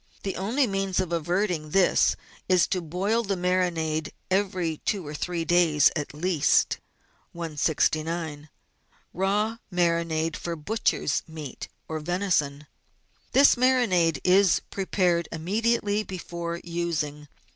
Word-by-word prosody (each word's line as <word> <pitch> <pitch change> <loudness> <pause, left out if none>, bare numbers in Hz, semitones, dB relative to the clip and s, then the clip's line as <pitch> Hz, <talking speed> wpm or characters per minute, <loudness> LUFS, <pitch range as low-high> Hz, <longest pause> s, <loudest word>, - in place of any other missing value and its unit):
The 195 - -3
only 230 +9 +1
means 195 -3 -1
of 185 -2 -1
averting 175 -1 -1
this 190 +3 +3 0.3
is 185 -2 +5
to 185 - 0
boil 190 +8 0
the 200 -3 -2
marinade 175 -4 0 0.2
every 185 -5 0
two 195 -5 -2
or 145 - -6
three 170 +2 -3
days 165 -4 +4
at 150 -3 -3
least. 155 -1 +2 0.6
169— 155 -1 -1 0.6
RAW 205 +5 0
MARINADE 170 -3 0
FOR 170 -1 -4
BUTCHER'S 210 +9 0
MEAT 155 -5 -8 0.2
OR 160 0 -3
VENISON 155 -4 -1 0.7
This 280 +1 +7
marinade 225 - +2
is 185 0 +4
prepared 180 -3 0
immediately 210 +5 0
before 170 -3 -5
using. 160 -4 -3
175 Hz, 115 wpm, -26 LUFS, 160-195 Hz, 0.7 s, This